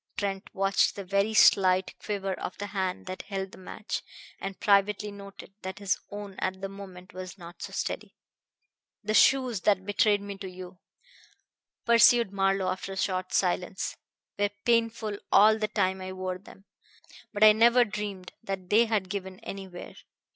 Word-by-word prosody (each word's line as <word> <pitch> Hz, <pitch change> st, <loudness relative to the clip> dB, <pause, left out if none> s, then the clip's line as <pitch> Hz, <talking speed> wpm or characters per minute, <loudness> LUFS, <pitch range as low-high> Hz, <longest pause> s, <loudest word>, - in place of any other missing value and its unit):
Trent 195 Hz, 0 st, -3 dB
watched 195 Hz, -1 st, +2 dB
the 200 Hz, -, -6 dB
very 200 Hz, +3 st, 0 dB
slight 185 Hz, -3 st, +5 dB
quiver 195 Hz, -2 st, -2 dB
of 185 Hz, -, -6 dB
the 205 Hz, -, -4 dB
hand 190 Hz, -2 st, -2 dB
that 185 Hz, 0 st, -6 dB
held 195 Hz, -1 st, -5 dB
the -, -, -13 dB
match, 195 Hz, +3 st, -5 dB, 0.4 s
and 195 Hz, -1 st, -6 dB
privately 205 Hz, +1 st, +2 dB
noted 200 Hz, -1 st, -11 dB
that 190 Hz, 0 st, -6 dB
his 200 Hz, -2 st, -1 dB
own 205 Hz, -1 st, -7 dB
at 185 Hz, 0 st, -2 dB
the 195 Hz, 0 st, -4 dB
moment 195 Hz, -1 st, -11 dB
was 185 Hz, +1 st, -8 dB
not 175 Hz, -1 st, -12 dB
so -, -, -6 dB
steady. -, -, -4 dB, 0.9 s
"The 215 Hz, +1 st, -1 dB
shoes 250 Hz, -4 st, +4 dB
that 190 Hz, -1 st, +2 dB
betrayed 205 Hz, 0 st, +3 dB
me 200 Hz, -1 st, -7 dB
to 190 Hz, -, -6 dB
you," 180 Hz, 0 st, -10 dB, 1.1 s
pursued 235 Hz, -2 st, +6 dB
Marlowe 195 Hz, -1 st, +1 dB
after 190 Hz, +1 st, -5 dB
a -, -, -8 dB
short 185 Hz, -1 st, -1 dB
silence, 180 Hz, 0 st, -1 dB, 0.4 s
"were 205 Hz, 0 st, +2 dB, 0.2 s
painful 230 Hz, -3 st, +1 dB
all 215 Hz, +2 st, +6 dB
the 215 Hz, -, 0 dB
time 190 Hz, -3 st, 0 dB
I 185 Hz, 0 st, -6 dB
wore 185 Hz, -1 st, -4 dB
them, 195 Hz, +1 st, -16 dB, 0.7 s
but 205 Hz, 0 st, +1 dB
I 215 Hz, -, +10 dB
never 235 Hz, +3 st, +5 dB
dreamed 205 Hz, -3 st, -6 dB
that 195 Hz, -4 st, -6 dB
they 225 Hz, +3 st, +6 dB
had 215 Hz, -4 st, 0 dB
given 190 Hz, -1 st, -5 dB
anywhere. 190 Hz, -4 st, -8 dB
195 Hz, 165 wpm, -28 LUFS, 185-210 Hz, 1.1 s, I